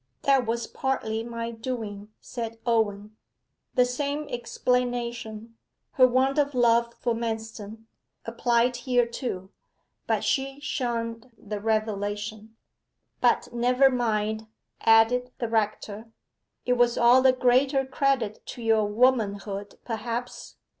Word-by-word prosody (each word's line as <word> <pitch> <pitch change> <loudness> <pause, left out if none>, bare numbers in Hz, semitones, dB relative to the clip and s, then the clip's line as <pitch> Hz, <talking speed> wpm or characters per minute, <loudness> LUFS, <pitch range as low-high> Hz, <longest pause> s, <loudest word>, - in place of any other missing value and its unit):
'That 270 -4 +3
was 235 0 -1
partly 225 -5 -2
my 230 0 -5
doing,' 225 -4 -5
said 230 -2 -6
Owen. 215 -3 0 0.6
The 250 - +5
same 285 +4 -2
explanation 240 -2 -2 0.3
her 255 -1 +6
want 265 +3 +2
of 285 -2 +1
love 235 -1 +3
for 240 - -1
Manston 225 -1 -5 0.4
applied 235 +1 +1
here 245 -1 +2
too, 235 -6 -5 0.6
but - - +1
she 275 0 -1
shunned 235 -5 -3
the 210 -1 -6
revelation. 215 0 -2 0.7
'But - - +2
never 250 +3 +4
mind,' 220 -3 -1 0.3
added 240 +3 +4
the 235 - -2
rector, 215 0 -2 0.6
'it 250 - +3
was 240 -1 +2
all 240 +2 +6
the 260 0 +6
greater 260 +2 +2
credit 265 -5 0
to 240 - -7
your 220 -1 +3
womanhood, 205 -3 0
perhaps. 235 +1 -5
235 Hz, 115 wpm, -26 LUFS, 220-250 Hz, 0.7 s, her